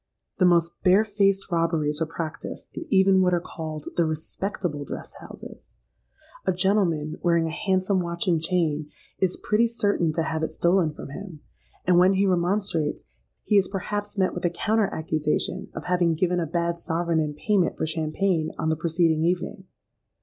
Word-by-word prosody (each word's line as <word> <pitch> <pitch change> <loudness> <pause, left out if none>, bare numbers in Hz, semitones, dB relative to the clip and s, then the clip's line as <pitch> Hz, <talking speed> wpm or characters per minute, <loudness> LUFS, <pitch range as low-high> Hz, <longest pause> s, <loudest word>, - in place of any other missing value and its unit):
"The 185 - +5
most 170 -1 +2
bare 190 +4 +5
faced 200 -2 +1
robberies 165 -3 0
are 160 - +1
practised 165 -1 -6
in 330 - -6
even 190 -1 +5
what 180 -1 +3
are - - +1
called 155 -3 -7
'the 170 - +3
respectable 155 0 -3
dress - - -7
houses.' - - -12 0.7
A - - +5
gentleman, 180 -5 +1
wearing 170 -2 +2
a 160 - -2
handsome 190 +2 +1
watch 170 0 -3
and 170 -3 +2
chain, 160 -4 0 0.3
is 185 -1 +1
pretty 220 +3 +2
certain 205 -7 +1
to 165 - 0
have 160 0 -2
it 160 - -1
stolen 175 -2 +2
from 150 - -9
him; 170 0 -9 0.4
and 180 -1 +5
when 185 +2 +5
he 195 +1 +3
remonstrates, 180 -4 0 0.4
he 205 - +4
is 190 - 0
perhaps 205 +1 -4
met 190 -1 +2
with 180 - -5
a 175 - +3
counter 215 +5 +1
accusation 155 -1 -1
of - - -6
having 175 -2 +2
given 180 +2 +1
a 165 - -1
bad 170 +1 -1
sovereign 165 0 0
in 150 -2 -1
payment 200 +2 +1
for - - -1
champagne, 160 +1 0
on 160 - -1
the 160 - +2
preceding 165 0 +1
evening. 180 +3 -1
175 Hz, 175 wpm, -25 LUFS, 160-190 Hz, 0.7 s, The